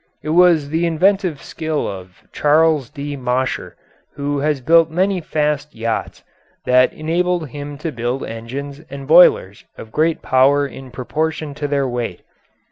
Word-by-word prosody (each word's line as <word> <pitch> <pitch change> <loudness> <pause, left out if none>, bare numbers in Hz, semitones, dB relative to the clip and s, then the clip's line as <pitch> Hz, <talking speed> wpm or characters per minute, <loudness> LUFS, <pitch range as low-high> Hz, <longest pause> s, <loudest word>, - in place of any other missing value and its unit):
It 155 - -5
was 165 -3 +4
the 165 +3 0
inventive 180 -1 +1
skill 155 -2 -3
of 95 -2 -9
Charles 150 -3 +2
D. 145 0 -6
Mosher, 130 0 -2 0.4
who 145 0 -2
has 150 0 0
built 165 +5 +4
many 185 +3 0
fast 150 -1 -2
yachts, 115 0 -3 0.4
that 125 0 +4
enabled 170 0 -1
him 145 +1 -7
to 155 +2 -4
build 120 +1 -3
engines 135 +6 -7
and 135 0 -8
boilers 155 - +5
of 110 - -10
great 160 +4 0
power 140 +2 +3
in 135 -1 -9
proportion 155 +4 -3
to 145 +1 -4
their 140 -1 0
weight. 120 -7 -4
145 Hz, 145 wpm, -19 LUFS, 130-160 Hz, 0.4 s, boilers